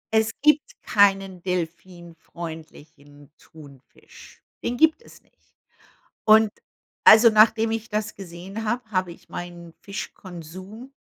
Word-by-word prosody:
Es 220 0 +3
gibt 300 -1 +3
keinen 195 -3 +2
delphinfreundlichen 165 -4 -8
Thunfisch, 140 -4 -17 0.2
den 245 - -2
gibt 315 - +3
es - - -18
nicht. - - -38 0.7
Und 215 0 +6 0.5
also, 225 +2 +8
nachdem 220 +1 +4
ich 225 0 -4
das 215 0 -3
gesehen 195 +3 -8
habe, 240 +3 -1
habe 185 -3 -1
ich - - -19
meinen 175 -1 -8
Fischkonsum 190 - -9
190 Hz, 110 wpm, -23 LUFS, 170-220 Hz, 0.7 s, also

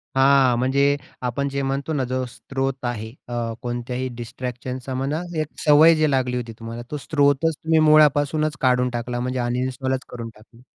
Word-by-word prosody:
हां, 135 -2 +5
म्हणजे 140 +2 +2 0.3
आपण 140 +3 -1
जे 140 0 -2
म्हणतो 140 +3 -2
ना 135 -3 0
जो 130 +1 -2
स्रोत 135 0 -4
आहे 110 -2 -3 0.2
अ, 120 -1 -3
कोणत्याही 125 +1 -3
डिस्ट्रॅक्शनचा 125 +2 -6
म्हणा, 140 +5 -2 0.2
एक 155 - -3 0.2
सवय 155 +2 +7
जी 155 -1 +2
लागली 125 -2 0
होती 115 -2 -5
तुम्हाला, 115 +1 -6
तो 150 - -2
स्रोतच 145 +1 +2
तुम्ही 160 0 +3
मुळापासूनच 150 0 +4
काढून 125 -1 +3
टाकला, 120 +1 -4
म्हणजे 125 +1 -2
अनइन्स्टॉलच 130 +2 -2
करून 115 -2 -6
टाकला. 115 +2 -19
130 Hz, 160 wpm, -22 LUFS, 125-140 Hz, 0.3 s, सवय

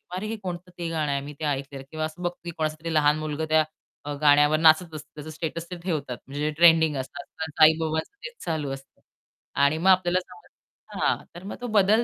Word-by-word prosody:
अरे 205 +3 -3
हे 225 - -3
कोणतं 180 0 -6
ते 170 -1 -3
गाणं 155 -3 -1
आहे 140 0 0
मी 145 +1 -8
ते 155 - -2
ऐकलेलं. 135 -1 -3
किंवा 155 0 -2
असं 160 +3 -8
बघतील, 175 0 -4
की - - -18
कोणाचा 155 -1 -1
तरी 165 -1 -3
लहान 150 0 +4
मुलगा 155 0 -3
अ, - - 0
त्या 155 -1 -1
गाण्यावर 145 +1 +5
नाचत 160 +1 +5
असतं, 150 - -9
त्याचं 150 +1 -8
स्टेटस 165 +2 -5
ते 180 - -4
ठेवतात. 145 -9 -2
म्हणजे 145 +2 -5
जे 155 - +1
ट्रेंडिंग 160 -3 +6
असतं, 135 +7 -6 0.2
तर 160 - -2
काही 155 0 +7
लोकांच 160 0 -1 0.2
तेच 485 -1 -7
चालू 155 -5 -2
असतं. 135 0 -12 0.6
आणि 150 +3 +3
मग 185 +4 +2
आपल्याला 185 -1 +4
समजतं 185 - -15
हां. - - +2 0.2
तर 175 - -9
मग 200 - -6
तो 245 - -3
बदल 215 +4 +4
160 Hz, 225 wpm, -26 LUFS, 150-175 Hz, 0.6 s, काही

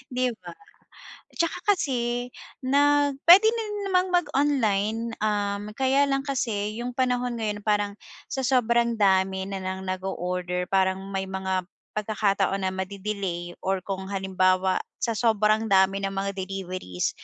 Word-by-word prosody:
'di 255 0 +2
ba? - - -10 0.8
Tsaka 335 -1 0 0.2
kasi 245 -3 -2 0.3
ng 285 0 +3
pwede 390 +5 +10 0.4
namang 370 -1 +2
mag-online, 260 - +1 0.2
um, 205 -1 0
kaya 270 +2 +3
lang 275 0 0
kasi 225 -5 -2
yung 245 0 -5
panahon 250 -2 0
ngayon 210 -2 -2
parang 205 -1 0 0.4
sa 265 - -1
sobrang 235 -2 +2
dami 190 -2 +2
na 195 0 -5
ng 190 0 -4
nag-o-order 180 -1 -3
parang 190 0 +2
may 190 0 -2
mga 190 -1 -2 0.3
pagkakataon 200 -2 0
na 190 - +1
made-delay 190 -2 -4
or 190 -1 -1
kung 190 -1 -4
halimbawa, 190 -1 +1 0.2
sa 230 -3 0
sobrang 220 -1 +2
dami 195 -1 +4
ng 195 0 -3
mga 195 +1 -1
deliveries, 185 - -3
205 Hz, 130 wpm, -26 LUFS, 190-245 Hz, 0.8 s, pwede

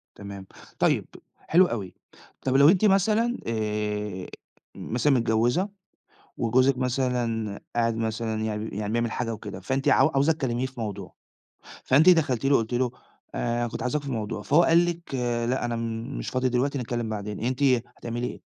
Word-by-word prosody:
تمام. 100 -1 -9 0.3
طيّب - - +2 0.3
حلو 180 +3 +4
أوي. 105 - -4 0.5
طَب 130 0 0
لو 140 +2 +7
أنتِ 190 +4 +4
مثلًا، 215 +5 +3
آآ 105 -3 -2 0.5
مثلًا 125 +5 0
متجوّزة 120 - +2 0.7
وجوزِك 130 +3 +3
مثلًا 125 -5 -1 0.2
قاعد 115 -1 +1
مثلًا 110 -1 -2
يع 110 -1 -2
بي 105 -1 -5
يعني 105 0 -2
بيعمل 120 -1 0
حاجة 115 -1 -2
وكده 105 -3 -7
فأنت 135 +9 -2
عاو - - +5
عاوزة 140 +1 +2
تكلّميه 130 -5 -2
في 130 -2 -8
موضوع 105 -3 -5 0.7
فأنتِ 145 +7 +5
دخَلتِ 145 -9 +4
له، 140 0 +5
قُلتِ 115 +2 -1
له 125 0 +1 0.4
آآ 120 0 -1
كنت - - -6
عاوزاك 140 +4 -1
في 140 -2 -5
موضوع، 105 -2 -3
فهو 150 +9 +4
قال 170 +1 +5
لِك 170 -4 -5 0.4
لأ، 130 - -1
أنا 120 -1 -1 0.4
مش - - -5
فاضي 130 0 +1
دلوقتي، 130 +3 0
نتكلّم 120 -2 -3
بعدين. 105 -1 -5
أنتِ 125 +4 -2 0.4
هتعملي 120 +1 -3
إيه؟ - - -7
120 Hz, 160 wpm, -26 LUFS, 110-135 Hz, 0.7 s, لو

